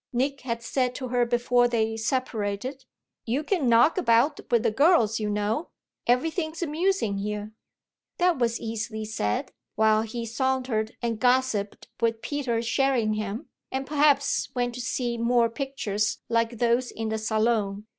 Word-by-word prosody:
Nick 270 +3 -1
had 235 -2 -4
said 250 +1 0
to 255 -3 -5
her 245 -1 +2
before 245 0 +3
they 225 -2 0
separated: 230 +1 -2 0.4
"You 255 +6 -1
can 310 -7 +1
knock 235 +10 +5
about 270 0 +3
with 235 -2 +3
the 230 - +2
girls, 230 - +4
you 210 -1 -1
know; 210 +9 -1 0.4
everything's 315 +6 0
amusing 320 - 0
here." 210 +1 -4 0.7
That 355 -5 +2
was 235 -1 +1
easily 220 -1 -4
said 155 - -2 0.2
while 215 0 +4
he 230 +1 -4
sauntered 245 -2 -1
and 230 -2 -1
gossiped 250 -5 +1
with 225 -1 0
Peter 255 -6 -1
Sherringham 225 -5 0 0.2
and 265 +1 -2
perhaps 290 -1 +2
went 245 -1 0
to 250 - -5
see 240 -1 -2
more 235 0 +3
pictures 225 -6 -2
like 230 0 +1
those 240 +2 +2
in 225 0 -4
the 220 0 -1
Salon. 215 -2 0
235 Hz, 145 wpm, -26 LUFS, 220-265 Hz, 0.7 s, knock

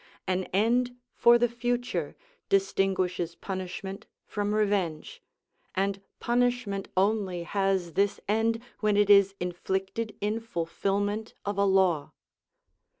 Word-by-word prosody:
An 185 0 0
end 245 +5 +1 0.2
for 235 0 +6
the 240 0 +3
future 240 +1 -2 0.3
distinguishes 190 -3 +1
punishment 190 +2 -6 0.2
from 205 0 -2
revenge, 200 -7 -1 0.5
and 195 +1 0 0.2
punishment 240 -5 0
only 190 -3 +1
has 190 -2 0
this 200 +3 +1
end 225 +2 +1 0.2
when 210 -1 +2
it 205 0 +5
is 200 -1 +6
inflicted 190 +5 -3
in 210 +2 -1
fulfilment 205 +2 -2
of 200 0 -2
a 200 - +4
law. 190 -6 +2
200 Hz, 110 wpm, -28 LUFS, 190-220 Hz, 0.5 s, for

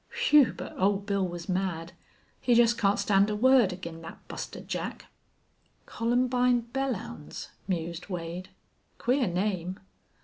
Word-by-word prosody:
Whew, 290 - +6
but 180 +1 -7
Old 200 +1 +2
Bill 200 -2 0
was 175 -1 -7
mad. 180 -3 -2 0.5
He 245 - +3
jest 235 0 +5
can't 200 -3 +2
stand 200 0 +3
a 210 - -1
word 250 -2 +5
ag'in' 170 -2 -7
thet 165 - -11
Buster - - -6
Jack." - - -5 0.8
"Columbine 245 +1 +2
Belllounds," 235 - -4 0.2
mused 170 -2 -3
Wade. 175 +1 -5 0.5
"Queer 250 0 +1
name." 185 0 -1
195 Hz, 130 wpm, -28 LUFS, 180-240 Hz, 0.8 s, Whew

